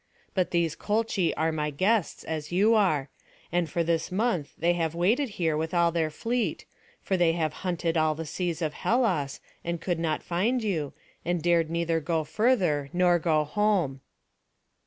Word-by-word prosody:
But 185 -2 +1
these 170 -2 0
Colchi 210 -4 0
are 160 +1 +1
my 150 -1 -1
guests, 190 +7 0
as 155 -1 -4
you 205 +6 +4
are; 155 -11 +2 0.4
and 175 -1 0
for 170 -2 0
this 165 +1 -1
month 185 -6 0
they 170 +2 +2
have 165 -2 -1
waited 225 +11 +2
here 160 -3 +1
with 160 +3 -2
all 170 -1 +4
their 160 -2 0
fleet; 230 +9 -2 0.4
for 190 - 0
they 175 -2 +3
have 160 -3 -1
hunted 175 -2 -1
all 155 -1 +2
the 165 +1 -5
seas 170 +1 -3
of 155 -1 -1
Hellas, 185 - 0 0.2
and 170 0 -2
could 175 0 -2
not 160 -2 -1
find 220 +8 0
you, 160 -9 -1 0.3
and 175 +1 0
dared 170 -2 +3
neither 170 0 0
go 160 0 -1
further, 160 - +1
nor 175 -1 +4
go 155 -2 +2
home." 170 -5 0
170 Hz, 175 wpm, -27 LUFS, 155-185 Hz, 0.4 s, you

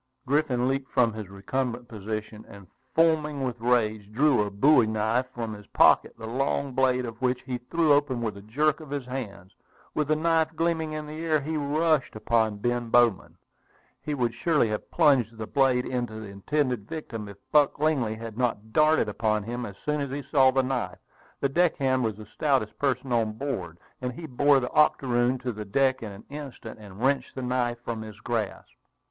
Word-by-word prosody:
Griffin 135 -3 +1
leaped 135 0 -1
from 115 -3 +3
his 105 -3 -7
recumbent 120 +5 -3
position, 110 0 -6
and, 100 -1 -12 0.3
foaming 155 -3 +2
with 125 -2 -3
rage, 110 -4 +1
drew 135 +1 +3
a 105 - -1
bowie 120 +4 +4
knife 110 +4 0
from 115 -3 -4
his 105 -1 -11
pocket, - - +4
the 110 - -8
long 135 +3 -1
blade 130 -1 +2
of 115 0 -8
which 125 0 0
he 125 -2 -4
threw 165 -3 +3
open 145 -3 +1
with 110 -3 -2
a 100 - -10
jerk 145 +9 +1
of 155 -3 -11
his 140 -2 -3
hand. 105 -7 -7 0.4
With 150 -2 0
the 155 - +3
knife 160 0 +1
gleaming 160 -1 0
in 155 0 -4
the 155 +2 -7
air, 155 -2 +2
he 155 +3 -4
rushed 150 -1 +1
upon 110 -1 +1
Ben 120 +2 -1
Bowman. 120 -4 +3 0.6
He 150 - -3
would 120 -3 0
surely 150 -2 +2
have 105 - -4
plunged 135 -8 +3
the 110 - -4
blade 130 +1 +2
into 120 -3 -3
his 110 -2 -7
intended 125 +1 -1
victim, 115 -9 -6
if 100 - -11
Buck 150 -2 +4
Lingley 140 -7 +1
had 115 0 -8
not 110 -3 -1
darted 155 -5 +4
upon 105 0 0
him 120 +2 -4
as 100 - -9
soon 150 0 0
as 140 - -3
he 140 +2 -4
saw 135 -3 +6
the 135 0 +2
knife. 130 -1 -2 0.4
The 140 - +3
deckhand 135 -5 +2
was 110 -3 -1
the 110 - -10
stoutest 115 0 -1
person 130 -2 -1
on 115 -2 +1
board, 105 - -4 0.2
and 125 0 -3
he 165 +6 -8
bore 145 0 +3
the 125 - -4
octoroon 125 -4 +3
to 130 -1 -2
the 105 -1 -6
deck 130 +6 +1
in 110 -3 -6
an 100 +2 -11
instant, 140 -7 -8
and 100 -2 -12
wrenched 135 +1 +1
the 130 - -4
knife 125 -1 0
from 115 -2 -3
his 110 -1 -9
grasp. 110 -3 -3
125 Hz, 195 wpm, -27 LUFS, 110-145 Hz, 0.6 s, saw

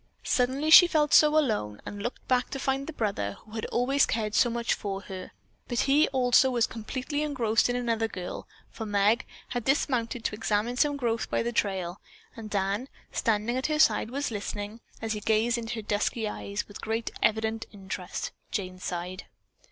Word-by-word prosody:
Suddenly 270 +5 +1
she 350 +2 +11
felt 300 -3 +2
so 305 0 +7
alone 210 - 0
and 205 0 -6
looked 240 +4 -5
back 250 -1 +2
to 270 - -4
find 270 +1 -1
the - - -4
brother 200 - -2
who 215 - -17
had 220 0 -4
always 270 +3 +2
cared 215 -2 -1
so 240 - +4
much 235 0 0
for 195 -1 -4
her, 190 -2 -8 0.4
but 240 -1 0
he 285 +3 +4
also 255 0 +4
was 240 -3 +2
completely 255 +6 -4
engrossed 245 -7 +1
in 245 - 0
another 230 -2 0
girl, 180 -4 -6 0.2
for 225 - -6
Meg 205 +4 +2 0.2
had 245 -2 -2
dismounted 245 -3 0
to - - -1
examine 215 +2 0
some 290 +2 +2
growth 235 -3 -1
by - - 0
the 235 - -1
trail, 190 -5 -1 0.3
and 225 -2 -8
Dan, 200 +5 -1 0.2
standing 225 +1 0
at 260 - 0
her 305 0 0
side, 300 - +4
was 280 +1 -2
listening, 205 +1 -5 0.2
as 220 -1 -1
he 210 - -3
gazed 225 +3 +2
into 230 +1 -4
her 220 - -4
dusky 210 +2 -1
eyes, 200 0 -4
with 205 - -10
great 225 +1 -2
evident 220 +1 +1
interest. 190 -2 -5 0.2
Jane 185 -3 -4
sighed. 180 +2 -5
225 Hz, 185 wpm, -28 LUFS, 205-255 Hz, 0.4 s, she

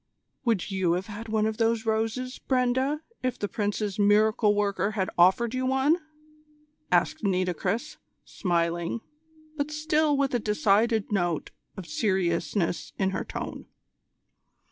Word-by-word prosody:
"Would 220 -4 0
you 190 -3 +1
have 180 +2 -2
had 220 +2 -8
one 215 -1 +1
of 220 0 -1
those 225 -1 +1
roses, 225 +4 -1
Brenda, 260 +3 +1 0.2
if 255 -1 -1
the 205 - -2
Prince's 205 -1 -2
miracle 210 +1 +4
worker 200 0 0
had 190 -3 -1
offered 190 +7 +4
you 255 0 -1
one?" 265 +5 +3 0.9
asked 315 - +2
Nitocris, 185 - -1 0.3
smiling, 170 +2 -1 0.6
but 285 0 -1
still 305 -1 +1
with 275 -1 +1
a 245 - +2
decided 215 +1 +2
note 175 -5 0 0.3
of 190 - -6
seriousness 175 0 -1
in 190 -1 +1
her - - -2
tone. - - -6
215 Hz, 130 wpm, -27 LUFS, 190-250 Hz, 0.9 s, miracle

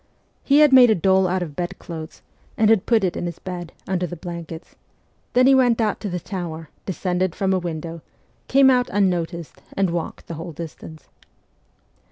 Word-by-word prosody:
He 285 +2 +5
had 295 -3 +6
made 250 -2 +8
a 220 - +4
doll 190 +1 +3
out 180 0 0
of 150 -4 -8
bedclothes, 175 -2 -6 0.3
and 220 0 +4
had 220 -4 +2
put 225 -4 +3
it 180 -2 0
in 175 - -3
his 170 - -6
bed, 175 -2 -7 0.2
under 180 -1 -1
the 175 - -7
blankets; 170 -1 -8 0.6
then 250 +1 +5
he 270 - +6
went 250 -3 +4
to 215 -2 -1
the 180 0 -3
tower, 165 -4 -6 0.2
descended 180 0 -1
from 195 -1 0
a 185 - +2
window, 165 -1 -5 0.5
came 270 0 +6
out 250 -1 +2
unnoticed, 175 -4 -1 0.2
and 195 -3 +2
walked 170 -1 -4
the - - -7
whole 165 +1 -7
distance. 160 -1 -9
180 Hz, 180 wpm, -22 LUFS, 170-205 Hz, 0.6 s, made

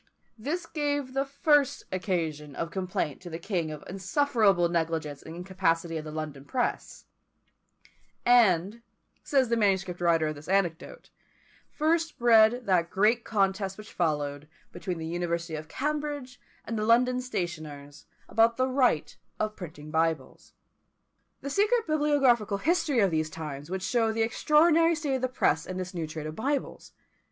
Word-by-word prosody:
This 305 +10 -3
gave 290 -4 -2
the 270 +1 0
first 290 -1 +2
occasion 160 -6 -2
of 165 - -4
complaint 185 -6 -3
to 180 - -8
the 165 - -5
king 170 -3 -2
of 155 -1 -7
the - - -13
insufferable 195 - +2
negligence 160 -4 -2
and 160 - -10
incapacity 170 -2 -1
of 155 - -3
the 155 - -6
London 150 -3 -6
press: 245 - -3 1.2
and, 220 -3 +4 0.4
says 265 -4 +2
the 235 - +2
manuscript 190 -5 0
writer 165 -2 +3
of - - -3
this 145 +1 -12
anecdote, 195 - -1 0.6
first 320 +1 0
bred 235 +1 +5
that 175 -3 +2
great 215 +5 +2
contest 195 -2 0
which 215 0 -11
followed, 150 -3 -1 0.2
between 180 -3 -4
the 160 - -5
University 170 0 -2
of 155 0 -5
Cambridge 290 - -3 0.3
and 225 -1 -3
the - - -1
London 250 +2 +4
stationers, 155 - -6 0.2
about 230 +1 +3
the 255 0 +2
right 250 - +1 0.2
of 215 0 -1
printing 155 -4 -9
Bibles. 160 -3 -1 0.9
The 280 - -5
secret 435 - +2
bibliographical 275 -9 +2
history 325 - +1
of 195 -3 +3
these 155 -1 0
times 150 -2 -7
would 185 0 -3
show 225 +3 +1
the 225 0 0
extraordinary 320 +8 +4
state 290 -4 -1
of - - -7
the 255 - +1
press 160 -10 +1
in 185 - -5
this 185 0 -5
new 165 -3 -3
trade 155 0 -6
of 155 0 -5
Bibles. 275 +5 -3
195 Hz, 155 wpm, -28 LUFS, 165-255 Hz, 1.2 s, bred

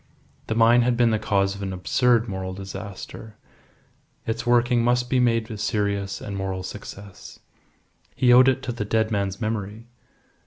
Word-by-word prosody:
The 110 - -2
mine 115 +2 +5
had 120 0 +1
been 120 -1 +3
the 110 - +1
cause 100 -2 +1
of 100 - -9
an 95 -1 -3
absurd 115 +7 +1
moral 95 -1 -5
disaster; 100 +2 -9 0.9
its 115 +2 -3
working 120 0 +3
must 125 0 +1
be 130 - +3
made 115 -2 +1
a 105 - -6
serious 100 -2 -1
and 100 - -6
moral 95 -1 -3
success. 100 0 -10 0.8
He 125 -1 +4
owed 125 +1 +7
it 130 0 +1
to 125 - -3
the 115 -3 -4
dead 110 +1 0
man's 100 -2 -2
memory. 110 0 -4
110 Hz, 165 wpm, -24 LUFS, 100-120 Hz, 0.9 s, owed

